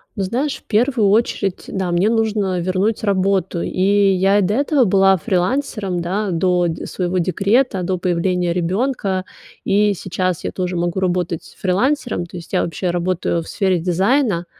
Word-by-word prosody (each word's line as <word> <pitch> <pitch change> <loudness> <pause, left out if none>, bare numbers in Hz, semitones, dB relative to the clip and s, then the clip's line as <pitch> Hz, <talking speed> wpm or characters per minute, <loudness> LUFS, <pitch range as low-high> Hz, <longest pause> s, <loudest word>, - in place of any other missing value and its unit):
Ну 200 - -2
знаешь, 260 +9 -1
в - - -21
первую 230 -2 +2
очередь, 200 -3 0
да, 190 -2 -2
мне 175 +4 +2
нужно 210 -5 0
вернуть 190 +5 -1
работу. 190 -3 0
И 185 - -3 0.3
я 195 +2 +3
и - - +2
до 205 - 0
этого 280 0 +2
была 195 -1 +4
фрилансером, 190 - -1
да, 195 +4 -2
до 180 0 +1
д 165 - -4
своего 180 0 -2
декрета, 195 +5 +1
до 185 +1 -1
появления 180 0 0
ребёнка. 190 +1 -1 0.4
И 205 +1 +3
сейчас 185 -1 -2
я - - -3
тоже 180 -1 -3
могу 175 +2 -1
работать 180 -2 -2
фрилансером. 205 0 0
То 180 - -9
есть 170 - -11
я - - +2
вообще 175 +2 -2
работаю 175 -1 -1
в 165 - -11
сфере 190 -4 0
дизайна. 190 - +1
190 Hz, 165 wpm, -19 LUFS, 180-210 Hz, 0.4 s, была